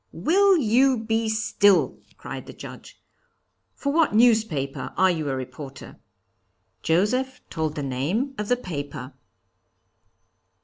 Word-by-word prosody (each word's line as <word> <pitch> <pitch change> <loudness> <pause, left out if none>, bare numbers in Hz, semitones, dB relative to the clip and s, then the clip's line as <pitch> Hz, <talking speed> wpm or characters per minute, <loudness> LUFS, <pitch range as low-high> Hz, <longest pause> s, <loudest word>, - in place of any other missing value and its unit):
'Will 390 +3 +3
you 260 0 +3
be 225 0 -1
still!' 215 -3 +2 0.2
cried - - -8
the - - -9
Judge. - - -11 0.8
For 280 0 -2
what 320 -8 +2
newspaper 170 - +2
are 190 0 +5
you 155 -4 -2
a 135 - -1
reporter?' 130 +2 -8 0.8
Joseph 250 +11 +1
told 160 -1 -2
the 145 - -3
name 155 - -1
of 210 - -2
the 245 - +3
paper. 145 - -6
210 Hz, 120 wpm, -24 LUFS, -, 0.8 s, are